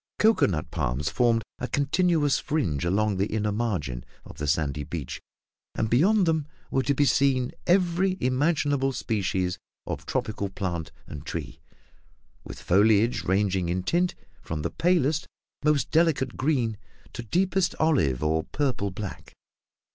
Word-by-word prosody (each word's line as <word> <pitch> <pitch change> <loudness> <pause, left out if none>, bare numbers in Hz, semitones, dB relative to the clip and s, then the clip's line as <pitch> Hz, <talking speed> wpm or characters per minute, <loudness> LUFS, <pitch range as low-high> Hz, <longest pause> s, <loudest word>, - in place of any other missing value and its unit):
Cocoa 220 +1 +4
nut 75 -5 -3
palms 65 +5 -1
formed 115 -2 +2 0.2
a 125 - -3
continuous 145 0 +2
fringe 85 - -1
along 100 +3 +1
the 100 +2 +1
inner 105 -1 -1
margin 90 - -2 0.2
of - - -12
the 75 - -2
sandy 75 -1 0
beach; 75 -2 -6 0.5
and 110 - -1
beyond 190 - +4
them 160 -3 +1 0.2
were 135 - +2
to 140 +1 0
be 145 - +3
seen 130 -2 +2 0.2
every 185 +1 +2
imaginable 140 0 +1
species 95 -6 -1 0.3
of - - -5
tropical 100 -2 -2
plant 85 -4 -4
and 75 -2 -8
tree, - - -6 0.8
with - - -9
foliage 105 0 +3
ranging 95 -1 +1
in 90 +1 -1
tint 175 - +1 0.3
from 75 -2 -4
the 85 - -2
palest, 160 - +1 0.4
most 150 -1 +2
delicate 155 -6 +2
green 125 -7 0 0.3
to - - -5
deepest 185 - +1
olive 80 - +2
or 80 +1 +1
purple 130 -8 -1
black. 100 0 -7
115 Hz, 140 wpm, -26 LUFS, 90-150 Hz, 0.8 s, Cocoa